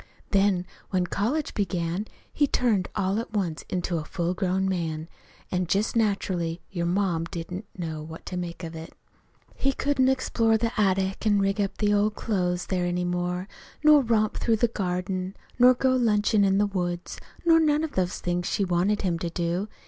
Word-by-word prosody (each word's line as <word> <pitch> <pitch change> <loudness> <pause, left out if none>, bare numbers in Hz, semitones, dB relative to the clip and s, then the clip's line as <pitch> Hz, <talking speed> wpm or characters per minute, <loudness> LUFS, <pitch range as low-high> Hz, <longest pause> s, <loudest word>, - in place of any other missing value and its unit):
Then 195 -2 +3 0.2
when 185 -2 +1
college 245 - -1
began 180 0 -1 0.3
he 290 - +3
turned 220 -9 +1
all 195 +2 +1
at 230 - -6
once 180 -6 -1
into 175 -2 -1
a - - -5
full 170 +2 -2
grown 190 0 0
man. 165 -4 -2 0.4
An' 180 -1 0
just 200 +7 +1
naturally 185 -6 0
your 170 -3 -1
ma 180 -2 +1
didn't 180 +4 -6
know 160 -3 -4
what 160 +1 -9
to 185 - -5
make 175 0 -5
of 165 0 -6
it. 160 0 -8 0.6
"He 275 0 0
couldn't 265 -2 +2
explore 230 -4 +2
the 230 +1 -1
attic 195 0 +1
an' 205 -1 +4
rig 195 +1 +1
up 195 - -2
in - - +4
the 205 - +3
old 210 +1 +2
clothes 180 -4 -1
there 180 -2 -1
any 175 0 -1
more, 180 +1 -2 0.4
nor 300 -1 +7
romp 220 -3 +1
through 230 - +2
the 240 - +3
garden, 185 -1 -2 0.2
nor 250 +1 +7
go 260 +1 +2
lunchin' 215 -3 +3
in 195 0 +3
the 205 - +4
woods, 175 -3 -3 0.3
nor 330 -1 +6
none 305 -1 +3
of 320 - -2
the 185 -6 +1
things 175 -1 -2
she 200 - +1
wanted 185 +4 +1
him 175 -3 0
to 170 - -2
do. 175 +4 -1
190 Hz, 185 wpm, -26 LUFS, 175-215 Hz, 0.6 s, nor